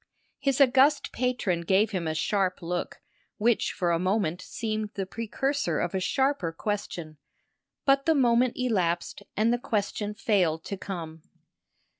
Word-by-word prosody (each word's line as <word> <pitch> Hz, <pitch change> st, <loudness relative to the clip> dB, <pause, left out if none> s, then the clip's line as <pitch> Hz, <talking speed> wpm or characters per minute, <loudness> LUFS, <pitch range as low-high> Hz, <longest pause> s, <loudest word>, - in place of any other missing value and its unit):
His 275 Hz, -1 st, +1 dB
august 275 Hz, +2 st, +4 dB
patron 235 Hz, -9 st, 0 dB
gave 195 Hz, +5 st, +2 dB
him 180 Hz, -5 st, -2 dB
a 155 Hz, -, -1 dB
sharp 190 Hz, +1 st, 0 dB
look 175 Hz, +1 st, -3 dB, 0.4 s
which 230 Hz, +1 st, +2 dB
for 175 Hz, -3 st, 0 dB
a 165 Hz, -, +2 dB
moment 185 Hz, -2 st, 0 dB
seemed 215 Hz, 0 st, -3 dB
the 195 Hz, -, -2 dB
precursor 270 Hz, +8 st, -1 dB
of 175 Hz, -, -1 dB
a 190 Hz, -, 0 dB
sharper 265 Hz, -, 0 dB
question; 170 Hz, -4 st, -4 dB, 0.7 s
but 275 Hz, +1 st, +3 dB
the 320 Hz, -, +5 dB
moment 245 Hz, -2 st, +3 dB
elapsed 190 Hz, -9 st, 0 dB, 0.2 s
and 225 Hz, +3 st, +3 dB
the 240 Hz, -, 0 dB
question 210 Hz, -2 st, -2 dB
failed 180 Hz, -8 st, +1 dB
to 200 Hz, -, -4 dB
come. 165 Hz, -5 st, -6 dB
205 Hz, 145 wpm, -27 LUFS, 180-245 Hz, 0.7 s, the